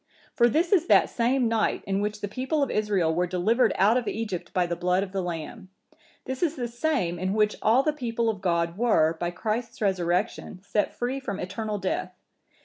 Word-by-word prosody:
For 240 -1 +4
this 330 +8 +1
is 350 -4 +3
that - - +5
same 245 +1 +1
night 225 -1 0
in 195 0 -1
which 210 0 -3
the 205 - -2
people 265 +8 -1
of 275 - -2
Israel 200 -6 +1
were 180 +2 0
delivered 215 +7 +2
out 210 +5 +4
of 245 - -2
Egypt 210 -6 -4
by 180 -1 +1
the 175 0 -2
blood 180 +2 +1
of 195 - -7
the 195 -1 -2
lamb; 180 +4 -6 0.6
this 260 0 -5
is 330 -3 +1
the 245 -4 -3
same 235 - -1
in 185 +2 -1
which 210 -1 +2
all 235 +5 +4
the 305 - +1
people 235 -5 -2
of 210 -4 -1
God 170 0 0
were, 165 -9 +3
by 175 - -1
Christ's 225 +6 -3
Resurrection, 185 0 -1
set 205 0 -1
free 250 +3 -2
from 200 -8 -5
eternal 210 +3 -3
death. 185 -1 -3
210 Hz, 205 wpm, -26 LUFS, 185-240 Hz, 0.6 s, that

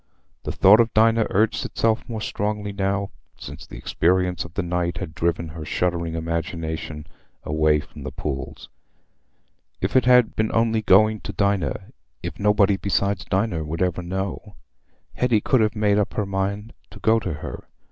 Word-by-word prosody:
The - - -2
thought 100 +4 +6
of 115 -1 +3
Dinah 115 +1 +4
urged 110 +3 +1
itself 115 +1 0
more 110 -2 -4
strongly 105 -1 -3
now, 100 0 -1 0.3
since - - -9
the - - -10
experience 90 0 +1
of 85 -1 -13
the 100 - -1
night 85 0 -1
had 85 -5 -6
driven 85 -1 -1
her 80 0 -8
shuddering 85 +1 -1
imagination 80 -2 -4 0.4
away 75 0 +2
from - - -13
the - - -6
pool. 70 -1 -4 1.2
If - - -2
it 130 - +5
had 125 -2 +5
been 110 0 +1
only 115 -1 +2
going 110 +2 +4
to - - -7
Dinah—if 100 -3 -3
nobody 105 -1 +3
besides 100 -1 0
Dinah 95 -4 0
would 80 +4 -2
ever 90 -1 -1
know—Hetty 100 +5 -4
could 130 +1 +2
have 110 +1 +1
made 105 -1 +2
up 105 - -1
her 105 - 0
mind 100 +3 -3 0.2
to - - -13
go 115 0 +3
to 95 -6 -4
her. 75 - -8
100 Hz, 160 wpm, -23 LUFS, 85-110 Hz, 1.2 s, thought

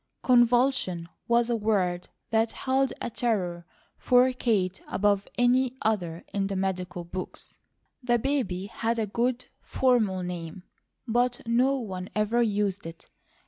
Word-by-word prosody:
"Convulsion," 240 -8 +3 0.2
was 235 0 +3
a - - +2
word 195 -5 0 0.2
that 225 0 +2
held 265 0 0
a - - -3
terror 180 -8 -1 0.3
for 255 +1 +4
Kate 195 -7 0
above 200 0 +1
any 250 +1 +2
other 180 -6 -1
in 195 -1 0
the 195 - -3
medical 185 -2 -2
books. 180 +2 -8 0.4
The 240 -1 +2
baby 230 -8 -1
had 230 +2 -2
a 225 - 0
good, 240 +4 -1 0.2
formal 220 -8 +1
name, 175 0 -6 0.4
but 245 +2 +1
no 250 +4 +2
one 190 -6 -5
ever 215 +3 +2
used 205 -4 0
it. 165 0 -12
220 Hz, 135 wpm, -27 LUFS, 185-245 Hz, 0.4 s, for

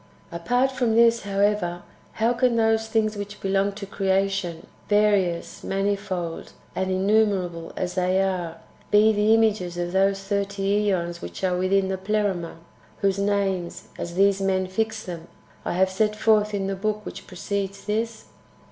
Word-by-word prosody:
3. 170 - -4
Apart 245 +10 +1
from 245 -4 0
this, 235 0 +5
however, 200 -3 0 0.3
how 230 +2 +1
can 245 0 +2
those 225 0 +2
things 220 -1 +1
which 205 0 -6
belong 195 +1 +1
to 200 0 -7
creation, 195 -3 -1 0.2
various, 205 -5 +1
manifold, 195 -4 -2 0.2
and 190 0 -1
innumerable 190 -3 +1
as 180 -1 -2
they 185 +1 +1
are, 180 -4 -1 0.3
be 215 +1 +5
the 210 +1 +2
images 205 -6 +1
of 175 0 -2
those 195 +1 +2
thirty 200 +1 0
2Eons 175 -3 -1
wdiich 190 - -3
are 180 - 0
with 185 +1 -1
in 195 -1 +3
the 190 -1 -2
Pleroma, 200 -4 -1 0.5
whose 195 -1 +1
names, 195 -3 -1
as 170 0 -5
these 195 +1 +3
men 190 -1 +1
fix 220 +3 -2
them, 170 -2 -7 0.4
I - - -2
have 190 +1 +2
set 210 +2 +1
forth 215 -1 +2
in 195 -1 -1
the 195 0 -2
book 210 +2 -2
which - - -8
precedes 195 +1 -4
this 220 +2 -2
195 Hz, 160 wpm, -24 LUFS, 185-210 Hz, 0.5 s, this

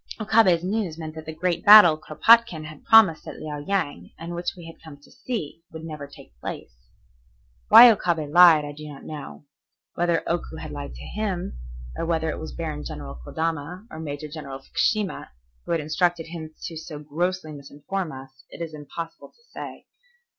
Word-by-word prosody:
Okabe's 215 -6 +3
news 190 -4 -2
meant 160 -1 -7
that 160 0 -10
the - - -4
great 170 +1 -2
battle 205 -6 +9
Kuropatkin 170 +3 +3
had 155 -1 -11
promised 215 -8 +6
at - - -8
Liao 150 -1 -6
Yang, 145 - -3
and 170 +1 -7
which 175 +2 -3
we 175 - -11
had 165 - -12
come 155 -3 -11
to 145 - -21
see, 205 - -5
would 160 0 -9
never 150 -3 -7
take 140 - -16
place. - - -7 1.0
Why 245 - +11
Okabe 175 -7 0
lied 160 -1 +7
I 145 - -6
do 150 +1 -10
not 145 -2 -11
know. 150 -1 -9 0.5
Whether 170 -1 0
Oku 170 -1 -2
had 160 -1 -8
lied 145 -1 -7
to - - -10
him, 185 - -4 0.4
or 165 - -3
whether 160 -1 0
it - - -6
was 160 - -7
Baron 155 -3 -5
General 70 -4 -8
Kodama 165 - -4
or 155 - -8
Major 150 -1 -5
General 145 -3 -8
Fukushima 200 +9 -1 0.4
who - - -3
had 165 - +1
instructed 165 +2 0
him 160 -2 -8
to 165 - -6
so 160 -1 -8
grossly 160 +3 -3
misinform 150 +5 -5
us, 130 -2 -12
it - - -12
is 165 -2 -5
impossible 155 +3 -8
to 470 - -31
say. - - -8
160 Hz, 180 wpm, -24 LUFS, 150-175 Hz, 1.0 s, Why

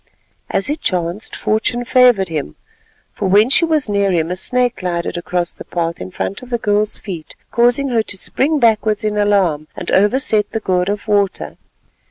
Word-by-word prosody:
As 195 - -1
it 295 +2 -3
chanced 180 0 -2
fortune 240 +3 -1
favoured 245 -7 +4
him, 150 - -4 0.6
for 200 - -2
when 210 +6 +4
she 335 - +5
was 310 -5 +1
near 200 -1 +1
him 165 -1 0
a - - -1
snake 250 +5 +1
glided 175 -2 -3
across 175 0 -2
the - - -11
path 170 -1 -3
in - - -6
front 190 +2 -4
of 255 - -12
the 240 - 0
girl's 210 -1 0
feet, 170 -6 -8 0.2
causing 245 +4 +2
her 235 -3 +2
to 205 -2 -4
spring 290 +10 0
backwards 220 -4 +2
in 210 -1 -1
alarm 195 -7 +1
and - - -5
overset 210 0 +2
the 225 - -1
gourd 185 -2 0
of 205 +2 -3
water. 200 -2 0
205 Hz, 185 wpm, -17 LUFS, 185-240 Hz, 0.6 s, she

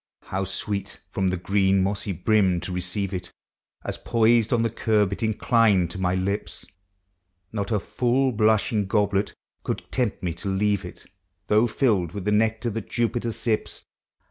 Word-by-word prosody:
How 95 +1 -3
sweet 100 +1 -4
from 95 -1 0
the 90 0 0
green 95 +1 +2
mossy 100 +1 -2
brim 95 -1 +2
to - - -5
receive 90 +2 -3
it, 90 -1 -5 0.6
As, - - -4
poised 115 -1 +3
on 120 -2 +3
the 115 - 0
curb, 105 -3 +1
it - - -7
inclined 110 -5 +3
to 95 - -6
my 90 0 +1
lips! 100 +3 -3 0.9
Not 100 -3 -3
a 105 - +2
full 125 +6 +1
blushing 110 -2 +2
goblet 100 -1 +1 0.3
could - - -3
tempt 120 -8 -1
me 85 -2 -1
to 85 +4 -5
leave 100 0 +1
it, 90 - -11 0.4
Though 110 +3 +4
filled 105 - +1
with 100 -2 -5
the 105 - +1
nectar 110 +2 +1
that 110 -1 -5
Jupiter 120 0 0
sips. 110 -1 -2
105 Hz, 165 wpm, -25 LUFS, 95-110 Hz, 0.9 s, Though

